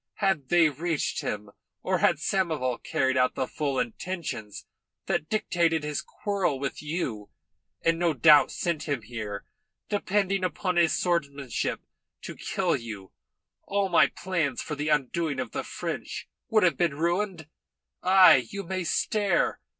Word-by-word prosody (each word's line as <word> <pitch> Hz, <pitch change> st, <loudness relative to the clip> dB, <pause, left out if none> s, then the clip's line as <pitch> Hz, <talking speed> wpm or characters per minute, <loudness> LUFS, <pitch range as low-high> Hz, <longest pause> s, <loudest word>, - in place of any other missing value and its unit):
Had 190 Hz, -10 st, 0 dB
they 175 Hz, -2 st, +5 dB
reached 155 Hz, +2 st, -2 dB
him, 105 Hz, -1 st, -4 dB, 0.3 s
or -, -, +1 dB
had -, -, +4 dB
Samoval 155 Hz, -10 st, 0 dB
carried 130 Hz, 0 st, 0 dB
out 125 Hz, 0 st, +2 dB
the -, -, 0 dB
full 140 Hz, 0 st, -2 dB
intentions 120 Hz, -, -4 dB, 0.4 s
that 155 Hz, -, -1 dB
dictated 170 Hz, -6 st, +1 dB
his 150 Hz, 0 st, -2 dB
quarrel 195 Hz, -8 st, -2 dB
with 140 Hz, 0 st, -4 dB
you, 150 Hz, -, -3 dB, 0.6 s
and 165 Hz, 0 st, +3 dB
no 170 Hz, -3 st, +2 dB
doubt 150 Hz, +2 st, +6 dB
sent 165 Hz, -3 st, -2 dB
him 140 Hz, -6 st, -1 dB
here 105 Hz, -3 st, -6 dB, 0.4 s
depending 195 Hz, -1 st, 0 dB
upon 180 Hz, +1 st, -1 dB
his 170 Hz, -2 st, +3 dB
swordsmanship 145 Hz, -7 st, -1 dB, 0.4 s
to -, -, -7 dB
kill -, -, 0 dB
you, 110 Hz, -5 st, -7 dB, 0.5 s
all 200 Hz, -1 st, -1 dB
my 175 Hz, -, +6 dB
plans 170 Hz, -8 st, -2 dB
for 155 Hz, -, -4 dB
the 150 Hz, +1 st, -2 dB
undoing 150 Hz, 0 st, 0 dB
of 125 Hz, -4 st, -3 dB
the -, -, -3 dB
French -, -, -5 dB, 0.2 s
would 215 Hz, -1 st, +4 dB
have 180 Hz, -, +3 dB
been 165 Hz, -5 st, +1 dB
ruined. 175 Hz, 0 st, -1 dB, 0.5 s
Ay, 185 Hz, -10 st, +7 dB
you 200 Hz, 0 st, -5 dB
may 185 Hz, +1 st, -3 dB
stare. 195 Hz, +2 st, +1 dB
160 Hz, 145 wpm, -27 LUFS, 135-185 Hz, 0.6 s, Ay